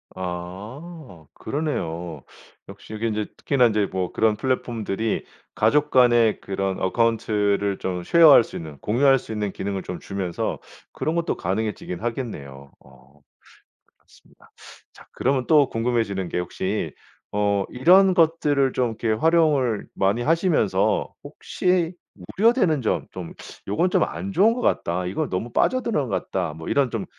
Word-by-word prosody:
아 95 - -8
그러네요. 85 - -4 0.5
역시 - - -11
이게 110 +2 -2
인제 105 -1 -2
특히나 130 -3 +3
인제 105 -2 +1
뭐 95 -2 -2
그런 110 -1 +2
플랫폼들이 115 -3 -2 0.3
가족 145 +8 +2
간의 120 -4 +4
그런 95 -1 -3
어카운트를 105 -2 +1
좀 90 -1 -3
share 165 - +6
할 130 - +8
수 - - -12
있는 75 -3 -8
공유할 135 - +3
수 125 - -11
있는 105 -2 -2
기능을 95 -1 -4
좀 90 - -6
주면서 95 -3 -3 0.3
그런 155 - -2
것도 170 -1 -1
가능해지긴 95 -2 -3
하겠네요. 70 - -6
어 65 +2 -21 0.8
그렇습니다. - - -24 0.4
자 - - -16
그러면 130 -1 0
또 150 -4 +5
궁금해지는 115 -6 -1
게 - - -2
혹시 95 +3 -3 0.4
어 100 -1 +1
이런 185 +9 +5
것들을 155 -5 +2
좀 125 -2 +1
이렇게 115 - 0
활용을 140 -3 +2
많이 100 +5 +1
하시면서 150 - +1
혹시 180 -2 -1 0.4
우려되는 200 - +3
점. 110 - -1
좀 90 -3 -8 0.3
'요건 135 - +1
좀 - - +2
안 195 - -6
좋은 200 +5 +4
것 245 - -4
같다. 90 - 0
이건 90 +2 -2
너무 100 +6 -3
빠져 255 - +2
드는 150 - -1
것 100 - -3
같다.' 90 -5 -1
뭐 80 +1 -8
이런 140 -2 +2
좀 115 -4 -4
110 Hz, 310 characters per minute, -23 LUFS, 95-145 Hz, 0.8 s, 할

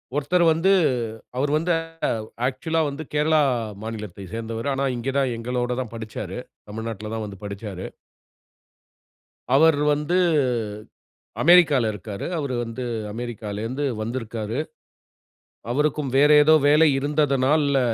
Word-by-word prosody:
ஒருத்தர் 150 +5 +2
வந்து 180 +5 +2 0.7
அவர் 145 +2 0
வந்து 170 +3 -1 0.8
ஆக்சுவலா 160 +5 -1
வந்து 145 +3 -6
கேரளா 155 +1 +3 0.4
மாநிலத்தைச் 105 -4 -7
சேர்ந்தவர். 115 +2 -4
ஆனா 135 - -1
இங்க 125 +3 -3
தான் 135 -2 +1
எங்களோட 125 +1 -2
தான் 115 -3 -7
படிச்சாரு. 105 -4 -6 0.3
தமிழ்நாட்ல 110 0 -5
தான் 110 - -3
வந்து 100 -1 -9
படிச்சாரு. 100 -2 -6 1.7
அவர் 160 0 +5 0.2
வந்து 150 +5 0 1.3
அமெரிக்கால 155 -9 +6
இருக்காரு. 100 0 -7
அவரு 140 -5 -2
வந்து 115 +2 -6 0.3
அமெரிக்காலிந்து 115 +3 -4 0.2
வந்திருக்காரு. 115 +1 -4 1.1
அவருக்கும் 150 0 0
வேற 145 +2 +6
ஏதோ 155 +1 +6
வேலை 155 +1 +6
இருந்ததனால்ல 145 0 +2
130 Hz, 105 wpm, -23 LUFS, 110-150 Hz, 1.7 s, அமெரிக்கால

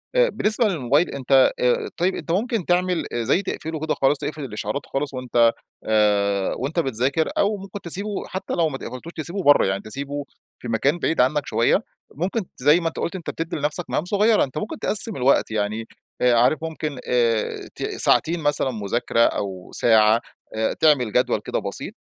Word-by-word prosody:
آآ، - - +4
بالنسبة 215 - +1
للموبايل 150 - +1
أنت 135 0 +3
آآ، 125 -1 +1
طيّب، 180 +2 +1
أنت - - -5
ممكن 215 +1 0
تعمل 180 0 +1
زي 120 - +1
تقفله 160 -4 -5
كده 155 +1 -1
خالص، 135 +2 +2
تقفل 150 0 -4
الإشعارات 110 +1 -4
خالص 140 +1 -3
وأنت 120 -2 +2 0.3
آآ، 100 -2 +2
وأنت 140 +7 -2
بتذاكر، 135 +2 0
أو 205 +1 +2
ممكن 195 +1 -9
تسيبه 200 +4 -4
حتى 190 - -5
لو 165 -2 +2
ما 135 - -5
ت - - -12
قفلتوش، 145 +7 -8
تسيبه 175 +5 -4
برّه 145 -2 +6
يعني، 95 +1 -1
تسيبه 140 +5 -5 0.3
في - - -8
مكان 135 +8 +1
بعيد 165 -4 +1
عنك 140 +3 +1
شوية. - - +2 0.3
ممكن 185 - -1 0.2
زي 150 +6 +4
ما 165 - -2
أنت 165 - -5
قُلت 170 - -3
أنت 175 -4 -6
بتدّي 165 0 -4
لنفسك 150 +3 -3
مهام 155 - -1
صغيّرة، 210 +3 +3
أنت 135 +1 -5
ممكن 220 - -4
تقسّم 215 0 +2
الوقت 130 -2 +2
يعني، 110 +1 -2 0.3
آآ 125 -1 +4
عارف 125 +5 +3
ممكن 155 -4 -4
آآ، 115 -3 0
ت - - -6
ساعتين 170 +2 +1
مثلًا 145 -3 +1
مذاكرة 115 +2 -2
أو 95 -5 -1
ساعة، 110 0 +4 0.3
آآ، 110 0 0
تعمل 140 -8 +3
جدول - - +2
كده - - -2
بسيط - - -6
145 Hz, 180 wpm, -22 LUFS, 120-175 Hz, 0.3 s, برّه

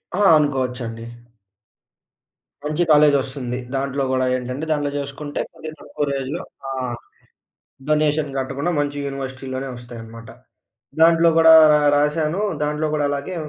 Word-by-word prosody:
ఆ! 200 - 0 0.2
అనుకోవచ్చండి. 125 -5 -2 1.6
మంచి 155 +3 0
కాలేజ్ 150 -1 +6
వస్తుంది. 130 -2 -5 0.2
దాంట్లో 135 +1 -1
గూడా 130 0 +1
ఏంటంటే, 125 +4 -4
దాంట్లో 145 -2 0
చేసుకుంటే, 140 +1 -6
కొద్ది 155 - -8
తక్కువ 150 -1 -4
రేంజ్‌‌లో 135 +4 -3 0.3
ఆ! - - -4 1.2
డొనేషన్ 150 -1 +1
కట్టకుండా 135 +5 -2
మంచి 145 0 -2
యూనివర్సిటీలోనే‌ 135 -1 -5
వస్తాయి 120 -1 -10
అన్నమాట. 115 +1 -12 0.7
దాంట్లో 165 0 +6
గూడా 160 0 +8 0.2
రా 150 - +4 0.2
రాశాను. 155 +5 0 0.2
దాంట్లో 150 +1 -1
గూడా 150 -1 0
అలాగే 145 +6 -4
140 Hz, 120 wpm, -21 LUFS, 130-150 Hz, 1.6 s, గూడా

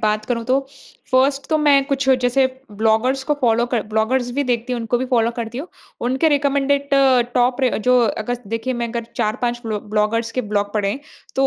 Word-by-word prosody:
बात 215 0 0
करूँ, 230 -2 -2
तो 270 +2 0 0.4
फर्स्ट 270 +2 +2
तो 315 - +2
मैं 285 -2 +4
कुछ 275 -1 -1
जैसे 260 +2 +3 0.3
ब्लॉगर्स 225 +5 +2
को 295 - +1
फॉलो 235 -1 +3
कर 240 -2 -1
ब्लॉगर्स 240 +3 0
भी 285 - +3
देखती 245 0 -1
हूँ, 240 - -2
उनको 235 +1 -1
भी 260 - -2
फॉलो 230 -1 +3
करती 235 +1 -4
हूँ। 310 - -5 0.4
उनके 265 +5 +2
रिकमेंडेड 280 -1 +1 0.5
टॉप 250 +2 +2
र 255 -4 +1
जो 250 0 +5
अगर 245 +4 -2
देखिए 230 +4 -2
मैं 235 - -1
अगर 235 0 -4
4-5 240 +2 -1
ब्लो 215 -2 -3
ब्लॉगर्स 215 +2 -1
के 255 - -1
ब्लॉग 205 -2 -2
पढ़ें 205 -2 +1
हैं, 270 - -5 0.4
तो 270 0 +3
245 Hz, 200 wpm, -20 LUFS, 225-270 Hz, 0.5 s, जो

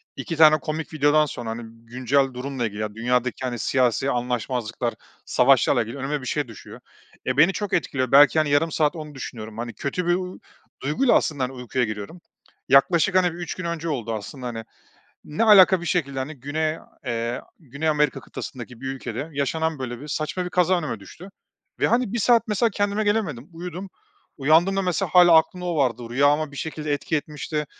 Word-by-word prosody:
2 165 - -5
tane 155 -1 +7
komik 155 +1 -5
videodan 150 +1 +3
sonra, 120 -5 -6
hani, 115 +1 -5 0.2
güncel 130 +2 0
durumla 125 -1 -3
ilgili, 105 +1 -7
ya, 105 0 -4
dünyadaki, 125 +2 -1
hani, 120 -2 -3
siyasi 130 +1 +1
anlaşmazlıklar, 120 -1 -2 0.3
savaşlarla 120 - +4
ilgili 115 +5 -8
önüme 140 +1 -3
bir - - -9
şey 145 -1 -1
düşüyor. 115 - -12 0.5
E, 130 +1 -1
beni 175 +6 +5
çok 205 -2 -4
etkiliyor. 130 -6 0
Belki, 145 +3 +7
hani, 155 -2 +1
yarım 155 +3 +2
saat 150 0 +1
onu 150 -2 -8
düşünüyorum. 110 -4 -8
Hani, 120 0 -5
kötü 170 +5 -3
bir, 175 - +4
uuu, 185 0 -5 0.4
duyguyla 155 - +2
aslında, 145 -4 +1
hani, 125 - -2
uykuya 125 0 -2
giriyorum. 110 - -7 0.5
Yaklaşık, 170 +7 +4
hani, 185 -1 +5
3 175 -1 -5
gün 185 - -6
önce 170 -1 -3
oldu 115 -6 -3
aslında, 125 +5 -6
hani, 115 -1 -5 0.6
ne 155 +10 -1
alaka 190 -4 +7
bir 175 - -7
şekilde, 140 -7 -1
hani, 140 +4 -4
Güney, 155 +3 -1 0.3
eee, 120 +1 -2 0.2
Güney 150 +1 -4
Amerika 150 -2 +1
kıtasındaki 125 -2 -9
bir 135 - -7
ülkede 135 +3 -5
yaşanan, 155 +2 -1
böyle, 120 -1 -5
bir 150 - -9
saçma 155 +5 -2
bir 180 - -5
kaza 180 0 +2
önüme 150 -10 -4
düştü 180 - -12 0.5
ve - - +4
hani, 235 -2 +1
1 235 - -1
saat 230 +2 +4
mesela 215 +2 +2
kendime 205 +1 -1
gelemedim. 185 - -1
Uyudum. 180 +3 -7 0.5
Uyandığımda 170 +8 +3
mesela 180 -2 -1
hâlâ 175 -2 +8
aklımda 180 +3 +1
o 170 -2 -1
vardı. 125 -4 +1
Rüyâma 145 +3 +2
bir - - -10
şekilde 155 -1 -4
etki 145 +2 -1
etmişti. 150 0 -4
145 Hz, 185 wpm, -23 LUFS, 125-170 Hz, 0.6 s, hâlâ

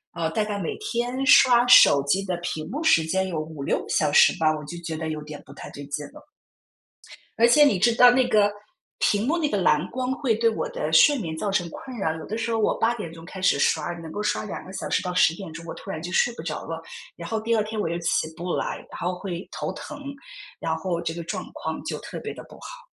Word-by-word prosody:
呃， 165 -1 -1
大 215 - 0
概 210 -1 -3
每 185 - -3
天 250 - -2
刷 245 -4 +7
手 145 - +8
机 195 +7 +1
的 185 -2 -2
屏 160 -3 -5
幕 300 +5 -3
时 165 - +5
间 190 +4 0
有 165 -4 -3
5、6 155 -3 -3
个 - - -11
小 150 -3 +1
时 - - +6
吧， 160 - +2
我 150 - -8
就 170 +2 -7
觉 160 -1 -4
得 160 0 -4
有 155 -1 -4
点 150 -1 -8
不 140 - -13
太 - - -10
对 145 0 -9
劲 145 +1 -4
了。 300 - -14 1.2
而 235 - +7
且 295 +5 +6
你 205 -11 +3
知 230 +3 +3
道 245 0 +8
那 255 0 +3
个， 205 -2 +3 0.5
屏 205 +2 +2
幕 325 +6 +1
那 310 -3 +1
个 205 - -1
蓝 170 -2 +2
光 255 +1 -2
会 245 -7 0
对 230 +1 +3
我 - - -3
的 - - -3
睡 290 -2 +6
眠 160 -5 -4
造 205 - -2
成 175 -3 0
困 255 +5 -9
扰。 160 -5 -1
有 160 - -8
的 220 - -4
时 230 0 -2
候 225 - 0
我 210 - +1
8 235 +1 +2
点 170 -7 -7
钟 165 0 -12
开 190 +1 -9
始 180 -6 +3
刷， 155 +3 +1
能 165 -2 -9
够 205 - -4
刷 210 - -1
2 210 - -6
个 190 - -10
小 - - -5
时 - - +1
到 180 -2 -4
10 165 -2 +4
点 185 -2 -8
钟， 165 +1 -9
我 165 - -6
突 - - -11
然 160 - -4
就 175 +2 -6
睡 240 +5 +2
不 - - -8
着 155 -2 -5
了。 165 0 -5 0.3
然 170 0 -8
后 220 - -1
第 230 +1 0
二 215 - +2
天 215 0 -5
我 205 - 0
又 170 +1 -2
起 165 -1 0
不 175 +1 -4
来， - - -2 0.2
然 - - -8
后 180 +1 -2
会 180 -2 -6
头 - - -3
疼， - - -9 0.6
然 - - -1
后 175 -3 -3
这 165 - -3
个 170 0 -6
状 165 - -5
况 - - -5
就 - - -3
特 - - -8
别 - - -6
地 - - -10
不 - - -13
好。 - - -11
185 Hz, 275 characters per minute, -24 LUFS, 165-230 Hz, 1.2 s, 手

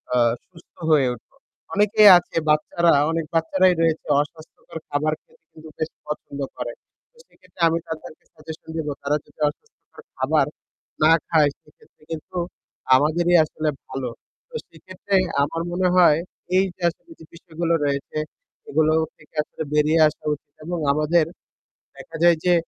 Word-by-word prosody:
আ - - +3 0.3
সুস্থ 170 -2 -19 0.2
হয়ে 140 -4 +5
উঠব। 115 - -22 0.4
অনেকেই 210 +1 +6
আছে 175 - -6
বাচ্চারা, 165 +3 +3 0.2
অনেক 165 -1 -1
বাচ্চারাই 180 +3 +3
রয়েছে 160 -1 +1 0.2
অস্বাস্থ্যকর 155 +2 -10
খাবার 150 +2 0
খেতে 165 - -29
কিন্তু 155 0 -13
বেশি 155 - -4
পছন্দ 150 -1 -6 0.2
করে। 120 -1 -5 0.5
সেক্ষেত্রে - - -17
আমি 165 - 0
তাদেরকে 160 -1 -8
suggestion 160 +1 -11
দিব 160 -2 -3
তারা 145 +1 0
যদি - - -26
অস্বাস্থ্যকর 450 - -16 0.2
খাবার - - +2 0.6
না 155 - +6 0.2
খায় 155 -3 +4
সেক্ষেত্রে 150 0 -25
কিন্তু 165 +3 -6 0.6
আমাদেরই 170 +6 +3
আসলে 155 0 -3 0.2
ভালো। 130 -1 -4 0.4
তো - - -13
সেক্ষেত্রে 185 +4 -5 0.3
আমার 165 +3 -2
মনে 180 +1 +1
হয় 170 -5 +6 0.4
এই 190 - +4
যে - - -25
আসলে 330 - -15
যে - - -13
বিষয়গুলো 170 0 -3
রয়েছে 140 +1 -2 0.5
এগুলো 155 +1 +3 0.2
থেকে 155 - -23
আসলে 160 - -7
বেরিয়ে 150 +2 +3
আসা 150 - -7
উচিত 145 0 -11
এবং 175 +1 -3
আমাদের 155 +3 +2 0.7
দেখা 165 - -11
যায় 170 -1 +6
যে 180 - +5
160 Hz, 145 wpm, -23 LUFS, 150-175 Hz, 0.7 s, অনেকেই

